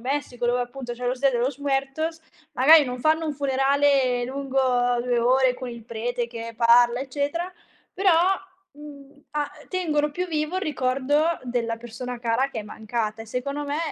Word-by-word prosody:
Messico 255 Hz, -1 st, -2 dB
dove 245 Hz, +1 st, +2 dB
appunto 245 Hz, 0 st, -5 dB
c'è 245 Hz, +1 st, -5 dB
"Los 250 Hz, +1 st, -1 dB
Dia 275 Hz, -1 st, +4 dB
de 240 Hz, -, -1 dB
los 260 Hz, +3 st, -1 dB
Muertos", 285 Hz, +4 st, -2 dB, 0.3 s
magari 295 Hz, +4 st, +7 dB
non 250 Hz, -1 st, -4 dB
fanno 315 Hz, +4 st, +2 dB
un 300 Hz, -2 st, -2 dB
funerale 270 Hz, -2 st, +2 dB
lungo 270 Hz, +1 st, -3 dB, 0.4 s
2 245 Hz, 0 st, 0 dB
ore 255 Hz, +1 st, +3 dB
con 255 Hz, 0 st, -7 dB
il 235 Hz, -2 st, -9 dB
prete 235 Hz, +1 st, -3 dB
che 230 Hz, -1 st, -7 dB
parla 240 Hz, +1 st, +5 dB
eccetera, 285 Hz, +7 st, -3 dB, 0.4 s
però, 385 Hz, -1 st, +3 dB, 0.6 s
mhmm, 285 Hz, -1 st, -13 dB
a 295 Hz, -1 st, -1 dB, 0.2 s
tengono 305 Hz, -5 st, 0 dB
più 360 Hz, +5 st, -3 dB
vivo 310 Hz, +2 st, -2 dB
il 380 Hz, -, -2 dB
ricordo 290 Hz, +3 st, +1 dB
della 235 Hz, -2 st, -2 dB
persona 240 Hz, +1 st, -7 dB
cara 235 Hz, +3 st, +1 dB
che 230 Hz, -, -5 dB
è -, -, -3 dB
mancata 220 Hz, +1 st, -4 dB
e -, -, -13 dB
secondo 280 Hz, +5 st, -3 dB
me 290 Hz, +1 st, -2 dB
265 Hz, 170 wpm, -24 LUFS, 245-290 Hz, 0.6 s, magari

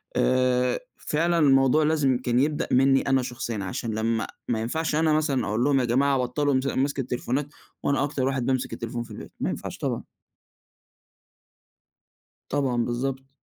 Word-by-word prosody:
آآ 125 Hz, -1 st, +2 dB, 0.2 s
فعلًا 170 Hz, +2 st, 0 dB
الموضوع 135 Hz, +1 st, +4 dB
لازم 150 Hz, -4 st, +2 dB
كان 125 Hz, -1 st, 0 dB
يبدأ 150 Hz, +2 st, 0 dB
مني 135 Hz, +1 st, +4 dB
أنا 135 Hz, -1 st, +2 dB
شخصيًا، 120 Hz, -4 st, -4 dB
عشان 110 Hz, +4 st, -3 dB
لمّا 115 Hz, 0 st, 0 dB, 0.2 s
ما 115 Hz, -2 st, 0 dB
ينفعش 160 Hz, +7 st, -1 dB
أنا 160 Hz, 0 st, +3 dB
مثلًا 150 Hz, -4 st, +1 dB
أقول 110 Hz, +3 st, 0 dB
لهم 140 Hz, 0 st, +3 dB
يا 125 Hz, -, +1 dB
جماعة 135 Hz, +3 st, +2 dB
بطلوا 140 Hz, +3 st, 0 dB
مس 130 Hz, +1 st, +1 dB
مَسك 140 Hz, +1 st, 0 dB
التليفونات، 130 Hz, +2 st, -2 dB, 0.4 s
وأنا 140 Hz, -1 st, +1 dB
أكتر 135 Hz, -2 st, -1 dB
واحد 135 Hz, -3 st, -1 dB
بيمسك 130 Hz, -1 st, -1 dB
التليفون 120 Hz, 0 st, -4 dB
في 115 Hz, -, -14 dB
البيت، -, -, -9 dB
ما -, -, -1 dB
ينفعش -, -, -5 dB
طبعًا. -, -, -2 dB, 2.5 s
طبعًا 130 Hz, -4 st, 0 dB
بالضبط. 135 Hz, +2 st, -3 dB
130 Hz, 155 wpm, -25 LUFS, 125-140 Hz, 2.5 s, الموضوع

